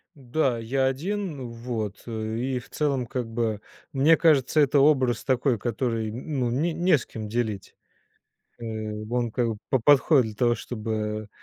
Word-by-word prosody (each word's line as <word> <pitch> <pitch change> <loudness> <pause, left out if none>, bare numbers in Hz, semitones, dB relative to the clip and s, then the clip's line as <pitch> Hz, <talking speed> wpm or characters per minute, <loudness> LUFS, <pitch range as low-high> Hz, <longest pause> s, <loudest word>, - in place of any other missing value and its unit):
Да, 130 -2 0
я 130 +4 0
один 155 -1 -3
вот, 115 -4 -5
э, 110 -1 -3
и, 130 +1 -1
в 120 - -13
целом, 140 -5 -1
как 125 0 -3
бы. 110 -2 -2 0.3
Мне 145 +5 +5
кажется 155 -2 +4
это 145 0 +4
образ 130 -5 +3
такой 130 -2 +1
который, 115 -1 -2
ну 130 0 -2
н 125 +4 -1 0.2
не 175 -6 +5
с - - -9
кем 110 -1 -7
делить. 110 -3 -3 0.8
Э, 120 - -8 0.5
он 120 -1 0
как 120 -1 0
бы 110 - -5
п 130 - +2
подходит 145 -2 +5
для 110 -1 -6
того 120 +1 +2
чтобы, 110 -2 -4
120 Hz, 165 wpm, -26 LUFS, 115-135 Hz, 0.8 s, Мне